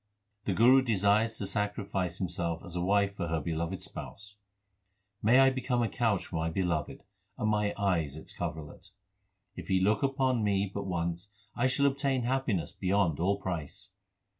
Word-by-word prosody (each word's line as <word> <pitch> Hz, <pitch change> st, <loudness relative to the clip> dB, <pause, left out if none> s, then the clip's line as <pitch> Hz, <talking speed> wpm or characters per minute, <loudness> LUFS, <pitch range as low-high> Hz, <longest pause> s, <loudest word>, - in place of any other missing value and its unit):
The 100 Hz, -, 0 dB
Guru 125 Hz, +5 st, +6 dB
desires 110 Hz, -1 st, +2 dB
to 100 Hz, -, -3 dB
sacrifice 100 Hz, -4 st, -2 dB
himself 85 Hz, -2 st, -3 dB
as 85 Hz, -1 st, -8 dB
a 90 Hz, -, -1 dB
wife 100 Hz, +2 st, +2 dB
for 85 Hz, -3 st, -3 dB
her 80 Hz, 0 st, 0 dB
beloved 85 Hz, +4 st, -3 dB
Spouse: 100 Hz, +1 st, -9 dB, 0.9 s
May 115 Hz, +4 st, +5 dB
I 135 Hz, 0 st, +6 dB
become 125 Hz, -2 st, 0 dB
a -, -, +1 dB
couch 110 Hz, -6 st, 0 dB
for 85 Hz, -, -5 dB
my 80 Hz, +1 st, 0 dB
Beloved, 85 Hz, -3 st, -2 dB, 0.3 s
and 110 Hz, -, -1 dB
my 105 Hz, -1 st, +1 dB
eyes 85 Hz, -8 st, 0 dB
its 80 Hz, -, -9 dB
coverlet. 80 Hz, -3 st, -6 dB, 0.6 s
1 -, -, -34 dB
If -, -, -7 dB
He 95 Hz, -, +2 dB
look 105 Hz, +7 st, +2 dB, 0.2 s
on 130 Hz, -4 st, +2 dB
me 100 Hz, -1 st, +1 dB
but 100 Hz, -1 st, -4 dB
once 85 Hz, +1 st, -2 dB, 0.3 s
I 120 Hz, +2 st, +2 dB
shall 130 Hz, +2 st, +2 dB
obtain 135 Hz, -2 st, +1 dB
happiness 120 Hz, -, -1 dB
beyond 95 Hz, -5 st, +1 dB
all 100 Hz, +4 st, +2 dB
price. 90 Hz, -7 st, -5 dB
100 Hz, 170 wpm, -30 LUFS, 85-115 Hz, 0.9 s, Guru